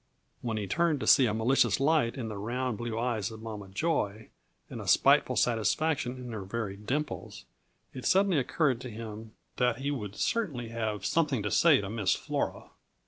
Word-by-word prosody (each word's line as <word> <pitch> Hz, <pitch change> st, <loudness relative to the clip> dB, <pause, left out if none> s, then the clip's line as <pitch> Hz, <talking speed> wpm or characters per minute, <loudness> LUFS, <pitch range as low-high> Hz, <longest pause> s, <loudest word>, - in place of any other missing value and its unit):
When 115 Hz, -2 st, -2 dB
he 105 Hz, -, -2 dB
turned 155 Hz, -, +1 dB
to -, -, -2 dB
see 130 Hz, -, +6 dB
a 105 Hz, -, 0 dB
malicious 120 Hz, +5 st, +2 dB
light 140 Hz, -4 st, +2 dB
in 120 Hz, -4 st, -4 dB
the 110 Hz, -, -5 dB
round, 120 Hz, +3 st, -3 dB
blue 120 Hz, -2 st, -3 dB
eyes 115 Hz, -3 st, -1 dB
of 110 Hz, -1 st, -10 dB
Mama 105 Hz, -3 st, -7 dB
Joy 110 Hz, -, -1 dB, 0.4 s
and -, -, -7 dB
a -, -, -9 dB
spiteful -, -, +4 dB
satisfaction 125 Hz, +4 st, +1 dB
in 125 Hz, -1 st, -7 dB
her 110 Hz, -2 st, -5 dB
very 100 Hz, 0 st, -4 dB
dimples, 130 Hz, +9 st, -4 dB, 0.5 s
it 130 Hz, -, -7 dB
suddenly 190 Hz, -4 st, +4 dB
occurred 130 Hz, -2 st, 0 dB
to 130 Hz, -, -6 dB
him 110 Hz, 0 st, -8 dB, 0.2 s
that 125 Hz, -2 st, +2 dB
he 140 Hz, +2 st, -2 dB
would 105 Hz, -7 st, -5 dB
certainly 150 Hz, -, -1 dB
have 110 Hz, -3 st, -3 dB
something 145 Hz, -6 st, +1 dB
to 105 Hz, -, -2 dB
say 160 Hz, -9 st, +5 dB
to 100 Hz, -, -5 dB
Miss 110 Hz, -4 st, +1 dB
Flora. -, -, -3 dB
115 Hz, 185 wpm, -29 LUFS, 110-135 Hz, 0.5 s, see